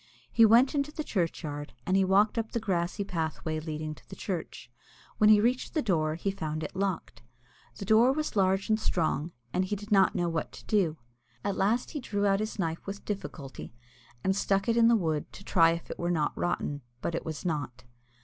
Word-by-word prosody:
He 230 - +6
went 240 +6 +5
into 285 0 0
the 310 - -4
churchyard, 155 - -3
and 185 - +1
he 195 - +4
walked 200 +4 +3
up 225 -1 -3
the - - 0
old - - -14
grassy 180 0 -1
pathway 160 -4 -3
leading 155 -1 -4
to - - -18
the - - -8
church. 170 -9 -5 0.5
When 215 - +6
he 215 -1 +8
reached 245 +8 0
the 310 - +3
door, 155 -6 +1
he 195 +4 -1
found 155 -4 -4
it 155 - -6
locked. 190 -11 -2 0.5
The 195 - -7
door 225 +5 +5
was 305 -1 -2
large 195 0 +2
and 215 -1 +2
strong, 165 -5 0 0.2
and 185 - +2
he 205 - -2
did 205 +2 -10
not 195 -2 +5
know 175 -1 +1
what 165 -2 -2
to - - -12
do. 180 -7 +1 0.5
At 200 - -1
last 225 +5 +1
he 300 - -4
drew 205 -5 -1
out 195 -1 +3
his 215 +1 -3
knife 165 -2 -3
with 200 +1 -6
difficulty, 150 - -6 0.5
and 190 - +2
stuck 195 +1 +1
it 230 - +3
in 230 -1 +6
the 235 - +6
wood 160 -7 -1
to - - -11
try 165 -4 +5
if 170 - -6
it - - -7
were 175 - -1
not 155 -4 0
rotten, 145 -4 -2 0.2
but 170 - -1
it 165 - -2
was 160 +2 -6
not. 145 -7 -3
190 Hz, 215 wpm, -29 LUFS, 160-215 Hz, 0.5 s, he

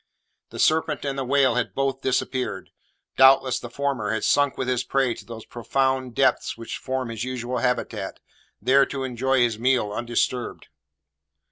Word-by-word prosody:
The - - -10
serpent 155 -2 +1
and 140 -1 -2
the 135 - -2
whale 130 -1 +3
had 125 0 -2
both 135 -1 -1
disappeared. 130 0 -2 0.5
Doubtless 130 -1 +5
the 120 - -8
former 135 -4 -2
had 110 0 -1
sunk 145 -1 +2
with 130 - -2
his 125 -1 0
prey 135 -3 +1
to - - -11
those 115 -1 -9
profound 130 +1 -1
depths 130 -3 +1
which 115 - -6
form 130 -2 -3
his 115 -1 -4
usual 125 -1 -3
habitat, 125 0 -2 0.4
there 135 +5 +4
to 135 -1 -4
enjoy 130 +1 +1
his 115 -3 +1
meal 125 -4 +2
undisturbed. 120 +2 -2
130 Hz, 160 wpm, -24 LUFS, 120-135 Hz, 0.5 s, Doubtless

